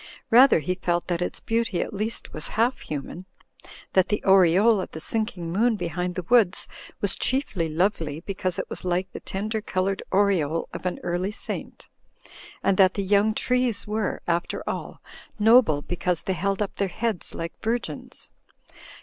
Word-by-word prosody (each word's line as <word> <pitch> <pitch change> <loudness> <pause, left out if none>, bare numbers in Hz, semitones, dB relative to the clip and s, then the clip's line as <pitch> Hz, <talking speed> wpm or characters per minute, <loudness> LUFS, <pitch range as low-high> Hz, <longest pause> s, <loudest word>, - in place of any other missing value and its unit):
Rather 245 - +7
he 180 +5 -1
felt 175 -1 -1
that 175 -1 -2
its 180 - -2
beauty 225 -5 -1
at - - -3
least 215 +3 -4
was 155 - -3
half 240 +3 +2
human; 155 +5 -6 0.7
that 190 -1 +4
the 210 - -1
aureole 195 +3 +5
of - - -6
the 160 - -6
sinking 185 -3 -2
moon 225 +5 +2
behind 180 -1 -3
the 185 - -3
woods 220 -6 +3 0.3
was - - +2
chiefly 215 - -1
lovely 160 -3 0
because 185 -1 -3
it - - -3
was - - -6
like 180 +1 -1
the - - -7
tender 215 +3 -3
coloured 195 -1 -1
aureole 185 -6 +2
of - - -4
an 180 - -2
early 175 +3 -1
saint; - - -5 0.8
and 195 - +2
that 190 -1 +5
the 200 - -1
young 205 +2 +3
trees 250 -4 0
were, 210 -1 -2
after 170 0 -1
all, - - -5 0.3
noble 215 - +5
because 175 -1 -2
they 190 - -1
held 195 +4 0
up 200 - -7
their 200 - +1
heads 220 +1 -2
like 165 0 -4
virgins. 235 +2 -4
190 Hz, 165 wpm, -25 LUFS, 175-215 Hz, 0.8 s, Rather